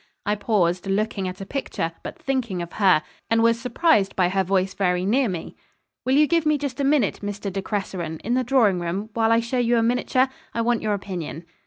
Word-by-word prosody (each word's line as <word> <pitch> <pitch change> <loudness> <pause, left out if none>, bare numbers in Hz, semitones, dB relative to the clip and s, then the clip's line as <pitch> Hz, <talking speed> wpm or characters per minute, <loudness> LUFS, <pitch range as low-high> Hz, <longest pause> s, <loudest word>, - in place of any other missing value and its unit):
I 205 - +1
paused, 195 -4 0
looking 195 -1 -1
at 185 +1 -6
a - - -5
picture, 190 -10 -3
but - - -7
thinking 250 -9 -2
of 170 - -10
her, 185 -7 +4 0.3
and 225 0 +3
was 230 0 +3
surprised 250 - +2
by 180 -2 +2
her 190 +1 +1
voice 190 0 0
very 180 -2 0
near 245 +4 +2
me. 175 -3 -5 0.5
'Will 260 +1 +2
you 300 +1 +6
give 335 +1 +2
me 305 -1 +2
just 280 -3 -4
a - - +1
minute, 275 -7 +2
Mr. 205 -1 -4
De 195 - -2
Cresseron, 185 -6 -4
in 235 - -1
the 255 +1 +2
drawing 230 -8 +3
room, 190 +6 -3
while 225 -1 +2
I 230 0 +4
show 235 +2 -2
you 240 0 +2
a 230 - +3
miniature? 250 +2 +2 0.3
I 230 - +1
want 235 0 +1
your 215 -1 0
opinion.' 175 -4 -6
210 Hz, 220 wpm, -23 LUFS, 190-245 Hz, 0.5 s, you